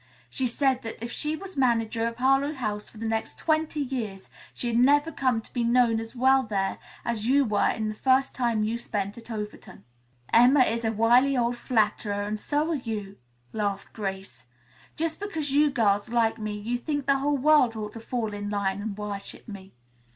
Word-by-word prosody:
She 260 - -1
said 260 +1 +1
that 225 - -6
if 235 +1 -6
she 300 +4 -2
were 385 - -9
manager 230 -3 +1
of 230 - -4
Harlowe 270 +4 +2
House 210 -5 -4
for - - -16
the 225 - -5
next 220 0 -2
twenty 310 -1 0
years 230 -8 -4 0.2
she'd 235 -1 -1
never 290 +5 +4
come 255 -6 0
to - - -19
be 240 - 0
known 235 -1 +3
as 225 +2 -8
well 265 +2 +4
there 200 -5 -2 0.3
as 230 -2 -2
you 275 +2 +4
were 210 -3 +2
in 220 -1 -2
the 260 +5 +2
time 235 -4 0
you 225 +2 -1
spent 200 -3 -3
at 230 - -16
Overton." 210 - -7 0.5
"Emma 250 +4 +6
is 230 -1 +1
a 225 - +1
wily 240 +5 +4
old 240 0 +1
flatterer 210 -3 0
and 210 +1 -3
so 300 +7 0
are - - +1
you," 215 -8 -4 0.4
laughed 205 -2 -3
Grace. 195 -2 -6 0.5
"Just 320 0 -2
because 320 -9 -3
you 295 +2 +4
girls 210 -5 +1
like 230 -1 +1
me 215 -1 -3
you 235 +4 -3
think 290 +1 -2
the 275 0 +3
whole 285 +1 +1
world 270 -4 +4
ought 210 -1 -5
to 230 - -8
fall 225 -2 -3
in 205 0 -4
line 200 -1 -1
and 205 -1 -5
worship 205 -1 -7
me." 195 -3 -9
235 Hz, 195 wpm, -26 LUFS, 210-265 Hz, 0.5 s, Emma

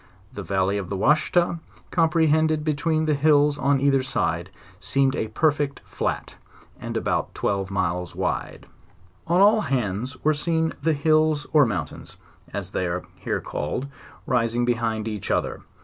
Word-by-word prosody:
The 105 - -6
valley 95 +2 0
of 95 - -6
the 100 - -2
Washita, 160 - +2 0.3
compre 165 -1 +3
hended 155 0 +2
between 155 +1 0
the 155 - +2
hills 145 0 +3
on 140 0 +2
either 135 -1 +3
side, 85 -8 -1 0.3
seemed 135 +4 +1
a 110 - -2
perfect 145 +4 0
flat, - - -3 0.4
and - - -4
about - - -1
twelve 100 -1 -1
miles 90 -3 -2
wide. - - -3 0.6
On 170 +3 +3
all 210 +2 +6
hands 125 - -2
were 155 - +4
seen 160 +2 0
the 160 - +2
hills 155 0 +2
or 150 -4 +6
mountains, 85 -9 -5 0.3
as 95 -2 -5
they 95 - -1
are 85 +1 -3
here - - -2
called, 75 - -3 0.4
rising 120 -1 +1
behind 115 -2 -1
each 105 -4 -5
other. - - -1
135 Hz, 150 wpm, -24 LUFS, 100-155 Hz, 0.6 s, all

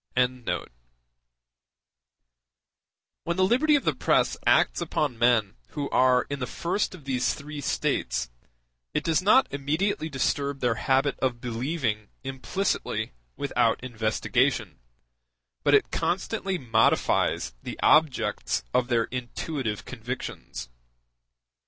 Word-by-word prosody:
] - - -44
When 125 0 +1 2.9
the 185 - +4
liberty 295 +9 +4
of 285 - +1
the - - +2
press - - +2
acts - - +4
upon 150 -7 -1
men 120 -3 +3 0.2
who 145 -3 -3
are 125 -1 +4
in 140 -1 -4
the 125 - -3
first 185 +3 -2
of 165 - -14
these 130 -2 0
three 150 0 -7
states, - - -1 0.6
it - - +1
does 165 +1 +2
not 215 +8 +5
immediately 155 +5 -1
disturb 140 0 -1
their 120 -3 +2
habit 135 +4 +1
of 125 -2 0
believing 120 -2 -2 0.2
implicitly 135 +9 -2 0.3
without - - +1
investigation, 110 -3 0 0.8
but - - +5
it - - +2
constantly 195 -1 -1
modifies 115 - +2
the - - -7
objects 155 - +3
of 125 - +2
their 120 -2 +2
intuitive 125 -2 -4
convictions. 125 - -6
130 Hz, 115 wpm, -26 LUFS, 120-155 Hz, 2.9 s, not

